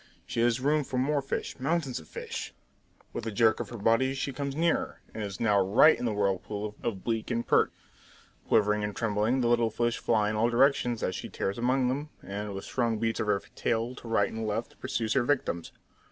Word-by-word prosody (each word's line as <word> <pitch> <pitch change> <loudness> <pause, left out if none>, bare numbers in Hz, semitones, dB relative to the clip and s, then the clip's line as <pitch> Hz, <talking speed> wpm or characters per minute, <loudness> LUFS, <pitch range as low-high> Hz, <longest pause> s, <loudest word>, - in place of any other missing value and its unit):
She - - -4
has 120 +1 +3
room 150 +3 +2
for 130 - -4
more 140 +3 +1
fish, 135 - -4
mountains 140 - 0
of 80 - -14
fish! - - -6 0.6
With 115 - -4
a - - -1
jerk 110 +2 +3
of 115 -4 -4
her 120 - -7
body 115 +6 +2
she 135 0 -3
comes 140 +1 -3
nearer, 165 +2 0
and 110 - -5
is 100 -1 -5
now 105 -3 +3
right 105 +11 +6
in - - -4
the 115 - +1
whirlpool 105 +1 -2
of 105 -5 -3
bleak 115 -2 -1
and 120 -1 -1
perch. - - +4 0.8
Quivering 105 -1 +3
and 105 -1 -3
trembling, 115 +3 +1
the 120 - +2
little 120 -1 +3
fish 120 +1 -1
fly 105 -2 +2
in - - -2
all 115 +2 +2
directions 120 -2 +2
as 95 - 0
she - - -5
tears 100 +4 -3
among 125 +1 +2
them, 145 +4 -2
and 100 0 -5
with 95 - -6
strong 115 -3 0
beats 115 +1 -1
of - - -1
her 100 -1 +2
tail 115 +1 -1
to 125 - -11
right 115 - +2
and 110 0 -3
left 110 +3 -3
pursues 120 -4 -1
her 135 - +3
victims. 120 - -1
115 Hz, 215 wpm, -29 LUFS, 105-130 Hz, 0.8 s, right